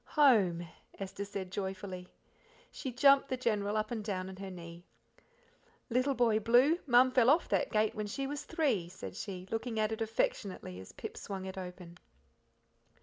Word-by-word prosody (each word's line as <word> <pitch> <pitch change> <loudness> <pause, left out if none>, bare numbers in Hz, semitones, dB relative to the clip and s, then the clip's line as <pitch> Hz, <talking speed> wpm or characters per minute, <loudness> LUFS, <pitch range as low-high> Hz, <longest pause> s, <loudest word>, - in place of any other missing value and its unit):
"Home!" 195 - +5 0.3
Esther 195 +1 -5
said 195 -2 -6
joyfully. 190 -1 -5 0.6
She 265 - -5
jumped 275 +3 +5
the 260 - -1
General 210 -4 0
up 215 +1 -1
and 225 -3 -3
down 190 -3 -3
on 190 - -9
her 195 0 -6
knee. 170 -1 -9 1.1
"Little 255 +3 +2
Boy 230 -3 +3
Blue, 245 - +4
Mum 250 +1 +6
fell 250 -1 +5
off 310 +5 +4
that - - +1
gate 215 -1 +2
when 210 -1 -3
she 270 +6 -3
was 290 +1 -4
three," 275 - 0
said 185 - -8
she, 185 -3 -6
looking 225 0 -2
at 215 0 +1
it 220 +1 -4
affectionately 200 - -2
as 95 - -10
Pip - - -8
swung 195 -2 -5
it 190 - -6
open. 180 -2 -8
215 Hz, 170 wpm, -32 LUFS, 185-245 Hz, 1.1 s, Mum